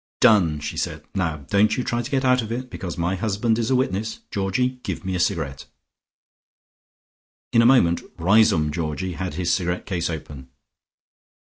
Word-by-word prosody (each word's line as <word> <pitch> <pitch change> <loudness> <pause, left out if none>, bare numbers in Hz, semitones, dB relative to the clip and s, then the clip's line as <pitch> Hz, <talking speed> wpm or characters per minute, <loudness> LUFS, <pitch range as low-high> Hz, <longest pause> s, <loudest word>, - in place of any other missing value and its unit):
"Done!" 95 - +4
she 75 - -5
said. - - -3
"Now 80 -6 -2
don't 105 +3 +3
you 125 - 0
try 120 0 -1
to 120 - -6
get 135 -1 0
out 125 -1 +4
of 110 0 -6
it, 125 +2 -4
because 90 -2 -6
my 85 +2 0
husband 110 +3 0
is 115 - -1
a 130 - +3
witness. 110 -3 -1
Georgie, 125 +7 -1
give - - -5
me 95 - -2
a 90 - -1
cigarette." 75 -8 -2 1.9
In 115 - +6
a 115 - +5
moment 85 -10 +4 0.2
Riseholme 85 -4 +4
Georgie 85 +3 -3
had 85 -1 -4
his 90 0 0
cigarette 90 -1 -1
case 85 -3 -2
open. 75 -5 -7
95 Hz, 175 wpm, -23 LUFS, 85-115 Hz, 1.9 s, In